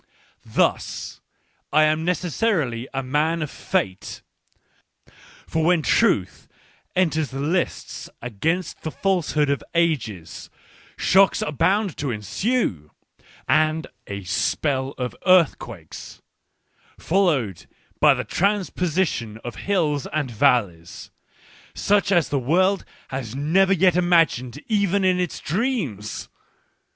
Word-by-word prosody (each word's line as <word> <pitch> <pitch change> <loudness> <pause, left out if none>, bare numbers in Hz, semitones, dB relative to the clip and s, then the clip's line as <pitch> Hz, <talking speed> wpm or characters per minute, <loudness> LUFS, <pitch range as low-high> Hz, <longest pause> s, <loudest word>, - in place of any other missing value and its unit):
Thus, - - -1 0.5
I 155 +1 +5
am 155 +1 +2
necessarily 170 - -1
a 135 0 -3
man 155 +5 0
of 150 - -6
Fate. 95 -1 -3 1.2
For 160 0 -1
when 170 -1 +3
Truth - - +1 0.5
enters 160 -5 +1
the 135 - -6
lists 170 +5 -2
against 160 - -2
the 160 - -4
falsehood 155 -6 0
of 140 - -2
ages, 115 - -1 0.5
shocks 195 +1 +4
are - - -2
bound 195 +5 +1
to 140 - -2
ensue, 105 - -1 0.6
and 155 +1 +2 0.2
a 100 0 -6
spell 130 - -1
of 125 -1 -4
earthquakes, 120 - +1 0.7
followed 140 - 0 0.3
by - - +6
the - - -3
transposition 180 - -1
of 120 -3 -6
hills 155 -8 +1
and 145 -4 -2
valleys, 95 -7 0 0.6
such 205 0 +2
as 175 -4 +3
the 140 - 0
world 185 +9 +2 0.2
has 130 -3 -5
never 175 +8 +2
yet 185 -2 +4
imagined 165 -8 +2
even 200 -3 +1
in 185 -1 +3
its 180 -1 -2
dreams. 165 - -2
155 Hz, 110 wpm, -23 LUFS, 125-185 Hz, 1.2 s, by